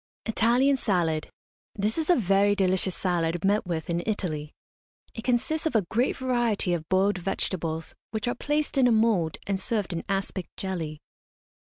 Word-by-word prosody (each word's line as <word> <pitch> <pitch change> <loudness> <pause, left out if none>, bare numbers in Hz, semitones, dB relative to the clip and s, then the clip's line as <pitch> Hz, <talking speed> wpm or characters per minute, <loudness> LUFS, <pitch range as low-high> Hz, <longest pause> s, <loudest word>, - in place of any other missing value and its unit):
ITALIAN 245 +5 +3
SALAD. 170 -9 0 0.5
This 210 +2 0
is 320 0 -2
a 355 - +7
very 200 - +3
delicious 190 -1 +2
salad, 175 -1 -1
met 205 -1 +2
with 160 -3 -3
in 170 0 -1
Italy. 155 -8 -2 0.6
It 225 - -7
consists 255 +6 +1
of 300 - -3
a 210 -5 +3
great 240 +4 +1
variety 240 -8 +1
of 160 -2 -3
boiled 190 +1 +2
vegetables, 165 -3 -2 0.2
which 220 +1 -3
are 240 - +1
placed 295 +1 -1
in 255 - +5
a - - +4
mould 220 -8 +2
and 195 -1 -1
served 210 -3 -1
in 165 - -3
aspic 195 -2 -2
jelly. 165 -6 -4
195 Hz, 165 wpm, -27 LUFS, 175-235 Hz, 0.6 s, a